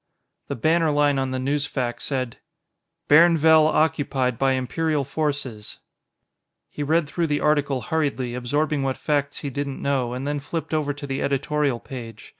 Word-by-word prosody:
The - - -3
banner 160 +6 +2
line 145 -1 +2
on 135 0 -1
the 130 - -2
newsfac 135 -2 -2
said: 130 -4 -3 0.7
BAIRNVELL 160 0 +6
OCCUPIED 145 -6 +1
BY 135 -1 +3
IMPERIAL 145 +4 -1
FORCES 140 -6 -3 0.9
He - - -6
read 155 +2 +2
through 170 +3 -1
the 145 -1 0
article 145 -3 +1
hurriedly, 135 -4 -1
absorbing 145 +4 -1
what 135 -1 -1
facts 145 -1 -1
he 140 - -4
didn't 140 0 -4
know, 130 -4 0
and 130 +2 -4
then 145 0 -1
flipped 160 +2 -5
over 150 -2 0
to 145 0 -7
the 135 -1 -3
editorial 140 -1 0
page. 115 -5 -9
145 Hz, 155 wpm, -23 LUFS, 130-150 Hz, 0.9 s, BAIRNVELL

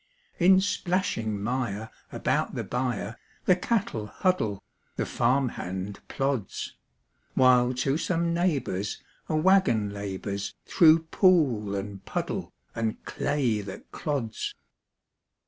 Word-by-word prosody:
In 185 +2 +7
splashing 175 - -1
mire 110 -3 -2 0.2
about - - 0
the - - -2
byre 125 -3 -2 0.3
The 185 - +6
cattle 180 - -1
huddle, 110 - 0 0.3
the - - -1
farm 130 +2 +2
hand 95 0 -5
plods; 135 -7 -2 0.6
While 125 -1 +5
to 135 +3 +1
some 170 -1 0
neighbor's 135 - -1 0.3
a 155 - +1
wagon 155 - +3
labors 100 0 -4
Through 165 -1 +6
pool 130 - +3
and 100 0 -5
puddle - - -3 0.2
and 115 -1 -3
clay 130 -8 0
that 100 -1 -9
clods. 135 -8 -3
125 Hz, 110 wpm, -27 LUFS, 105-165 Hz, 0.6 s, In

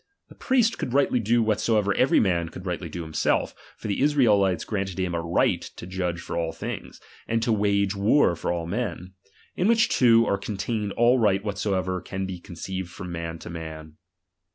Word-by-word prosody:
The - - -13
priest 245 -4 +1
could 125 - -3
rightly 140 -3 +3
do 115 +1 +2
whatsoever 105 -1 +1
every 130 - +3
man 85 -5 +1
could 95 - -10
rightly 90 -2 -3
do 85 +2 -5
himself; 80 -1 0 0.2
for - - -7
the 100 - -1
Israelites 105 - +3
granted 95 -3 -3
liim 90 -2 -1
a 85 - -1
right 85 +1 +1
to - - -9
judge 90 -2 -3
of - - -9
all 85 -1 -1
things, - - -7 0.3
and 115 0 0
to 115 - +2
wage 100 -1 +1
war 100 0 +3
for 80 - -2
all 85 -1 -2
men; 95 -1 -4 0.4
in 180 - +1
which 230 0 +4
two 115 -2 +5
are 100 - 0
contained 105 +1 -3
all 120 +2 +4
right 100 -3 +2
whatsoever 95 -3 -1
can 95 +2 -4
be 95 -2 -6
conceived 90 +1 -6
from 90 +1 -8
man 85 -1 -4
to 85 - -9
man. 80 -2 -8
95 Hz, 190 wpm, -25 LUFS, 85-115 Hz, 0.4 s, two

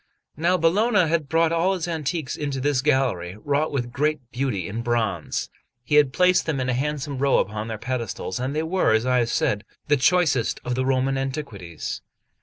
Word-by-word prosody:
Now 175 +4 +2
Bologna 190 +3 +3
had 155 -3 0
brought 165 +1 +3
all 175 +3 +2
his 175 -2 -3
antiques 160 -3 -2
into 140 -3 -3
this 140 -1 +1
gallery, 125 - 0
wrought 145 +6 0
with 120 -4 -2
great 150 +3 0
beauty 120 -9 -2
in 110 +3 -4
bronze, 115 -8 -1 0.4
and 150 - +2
had 145 -3 +5
placed 180 +4 +3
them 150 -4 0
in 130 0 -1
a - - +1
handsome 140 +1 -2
row 140 0 +3
upon 105 +2 -1
their 110 -1 -4
pedestals; 115 -5 -4
and 130 +3 -2
they 155 - 0
were, 175 -6 +2
as 110 +2 +1
I 125 0 +3
have 120 -1 0
said, 105 -2 0 0.3
the 145 - +5
choicest 140 -5 +2
of 125 - -1
the 130 +1 -1
Roman 135 0 +1
antiquities. 115 - -5
135 Hz, 195 wpm, -24 LUFS, 120-155 Hz, 0.4 s, had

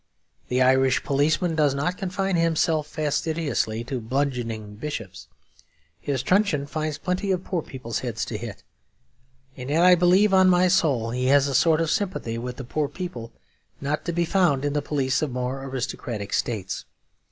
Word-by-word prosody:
The 125 +1 +2
Irish 130 0 +3
policeman 155 +5 +1
does 150 -3 +2
not 170 +6 -1
confine 190 0 -2
himself 160 -2 +1
fastidiously 150 -6 -1
to 125 0 -4
bludgeoning 115 -4 -2
bishops; 110 - -6 0.7
his 135 -3 -2
truncheon 180 -4 +2
finds 155 +1 -3
plenty 185 +2 -2
of 180 -1 -1
poor 180 -3 -2
people's 130 -5 -5
heads 115 -3 -3
to 110 - -4
hit; 115 -3 -8 0.9
and 125 +1 -7
yet 160 +4 +3
I 180 0 +8
believe 180 +4 +4
on 190 -1 +6
my 180 0 +4
soul 140 -11 +2
he 125 +1 -1
has 140 +1 +5
a 140 - -2
sort 155 +4 +4
of 165 -1 0
sympathy 120 - -2
with 125 +1 -6
poor 150 +2 -1
people 140 -10 -7 0.5
not 145 +2 -2
to 170 - -1
be 170 0 0
found 165 -6 +2
in 145 - 0
the 145 - 0
police 135 -3 0
of 155 - 0
more 125 +2 -3
aristocratic 120 -5 -4
states. 105 -6 -2
145 Hz, 165 wpm, -24 LUFS, 125-170 Hz, 0.9 s, I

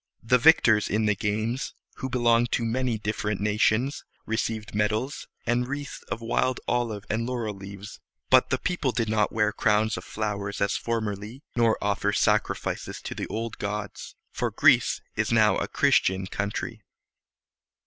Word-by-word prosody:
The 125 +3 +4
victors 115 -7 +5
in 110 +2 +1
the 105 - +3
games, 110 +5 -2 0.2
who 130 - -4
belonged 120 -1 +3
to 120 - +1
many 120 0 0
different 105 -1 -2
nations, 110 +6 +1 0.2
received 110 -1 -2
medals, 110 +6 -1 0.2
and 125 +1 +1
wreaths 145 +1 -5
of 115 - -3
wild 120 +2 0
olive 115 -4 -1
and 115 +2 -1
laurel 120 -4 -2
leaves; 100 +1 -10 0.3
but - - +6
the - - +1
people 175 -7 -1
did 115 -2 -1
not 105 -1 +1
wear 105 -1 +1
crowns 105 0 +2
of - - -6
flowers 100 -2 -3
as 100 - +1
formerly, 110 +2 -3
nor 115 -2 +3
offer 105 0 0
sacrifices 105 -1 0
to - - -4
the - - -4
old 115 0 -4
gods, 105 0 -5 0.2
for - - -1
Greece - - +4
is - - 0
now - - +4
a - - -1
Christian 95 0 +2
country. 105 +3 -4
110 Hz, 155 wpm, -26 LUFS, 105-120 Hz, 0.3 s, but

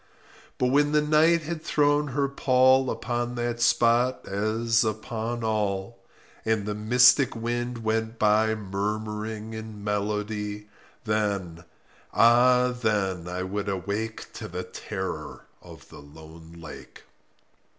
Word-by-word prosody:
But 125 - +1
when 145 +2 +3
the 150 - +4
Night 155 +2 +4
had 160 0 -5
thrown 145 0 +2
her 140 +1 0
pall 130 -1 +3
Upon 120 +1 -3
that 120 0 -3
spot, 120 +1 +2
as 110 +3 +1
upon 110 +2 -3
all, 105 0 -2 0.4
And 110 -2 0
the 105 - -2
mystic 125 +5 +4
wind 120 +1 -3
went 110 +1 -1
by 110 +1 +3
Murmuring 105 +2 -4
in 110 -2 -8
melody— 105 0 -3 0.4
Then—ah 110 +5 +1
then 95 -6 0
I 90 +1 -3
would 100 +2 -3
awake 100 +4 -4
To - - -7
the 90 +1 -5
terror 90 -5 -6 0.2
of - - -14
the - - -12
lone 80 +3 -14
lake. 85 -3 -12
110 Hz, 120 wpm, -26 LUFS, 105-120 Hz, 0.4 s, the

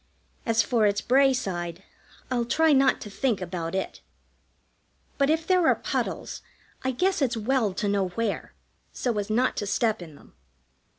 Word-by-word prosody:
As 225 -1 +3
for 220 0 +2
its 205 0 +1
Bray 270 +2 +4
side, 180 -7 -3 0.5
I'll 245 -2 +1
try 320 +5 +3
not 270 0 +4
to 210 - -7
think 240 -1 0
about 175 -2 -4
it; 190 - -3 1.2
but 280 0 +3
if 320 +1 +1
there 365 -2 +3
are - - +5
puddles, - - -3 0.4
I 260 - 0
guess 360 +7 +1
it's 245 -4 +1
well 225 -1 +1
to 205 - -1
know 200 -2 +1
where, 205 +4 -3 0.4
so 245 -3 -2
as 205 +1 -4
not 245 +4 +2
to 205 - -2
step 220 0 +1
in 160 -4 -10
them. - - -19
225 Hz, 170 wpm, -26 LUFS, 195-265 Hz, 1.2 s, are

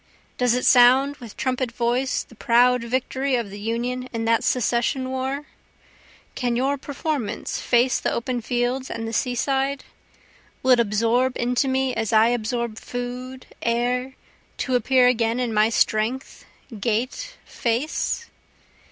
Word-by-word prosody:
Does 245 -1 +3
it 250 - -1
sound 260 +3 +6
with 235 -6 -11
trumpet 255 -2 -1
voice 245 +2 0
the - - -19
proud 245 +1 +3
victory 260 +2 -1
of 230 -5 -2
the 205 - -8
Union 245 +4 -3
in 225 -1 -3
that 230 0 +2
secession 250 +2 0
war? 265 +2 -3 0.9
Can 245 -2 -1
your 270 +4 +1
performance 285 -4 -3
face 245 +1 +2
the - - -1
open 240 +1 -2
fields 245 +2 -1
and 225 -1 -4
the 225 - -5
seaside? 270 +4 0 0.8
Will 260 - +3
it 250 - +6
absorb 230 +4 +1
into 245 +3 +1
me 265 0 0
as 225 -3 -2
I 220 +1 +5
absorb 235 -1 -2
food, 250 +1 -6 0.2
air, 250 +3 -1 0.4
to 260 - -2
appear 250 +1 +4
again 235 -1 +2
in 245 -3 -1
my 215 +1 +4
strength, 225 +3 0 0.3
gait, 235 - -2
face? 255 - -2
245 Hz, 140 wpm, -23 LUFS, 235-260 Hz, 0.9 s, sound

